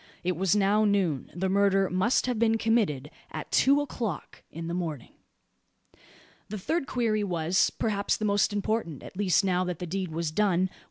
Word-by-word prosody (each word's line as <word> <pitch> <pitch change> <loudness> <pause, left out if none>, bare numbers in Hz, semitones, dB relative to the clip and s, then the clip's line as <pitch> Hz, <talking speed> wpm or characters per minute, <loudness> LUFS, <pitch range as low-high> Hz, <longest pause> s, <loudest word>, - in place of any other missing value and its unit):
It 180 0 0
was 190 +3 +1
now 205 +1 +3
noon. 190 - +1
The 190 +2 -1
murder 195 0 +3
must 185 +8 +1
have 250 -3 -1
been 225 -1 +3
committed 205 - 0 0.2
at - - -7
two 280 +2 +4
o'clock 230 - -5
in 165 +1 -7
the 170 - -4
morning. 160 -8 -4 1.4
The 215 - -4
third 300 - -2
query 220 -4 0
was, 175 -1 +1
perhaps, 205 -3 -1
the 215 - -3
most 205 +1 +2
important 205 - -2
at - - -11
least 195 0 +2
now 180 -1 +1
that 180 -2 -3
the 180 - -5
deed 185 +1 -3
was 165 0 -2
done. 185 0 +1
195 Hz, 175 wpm, -27 LUFS, 175-215 Hz, 1.4 s, two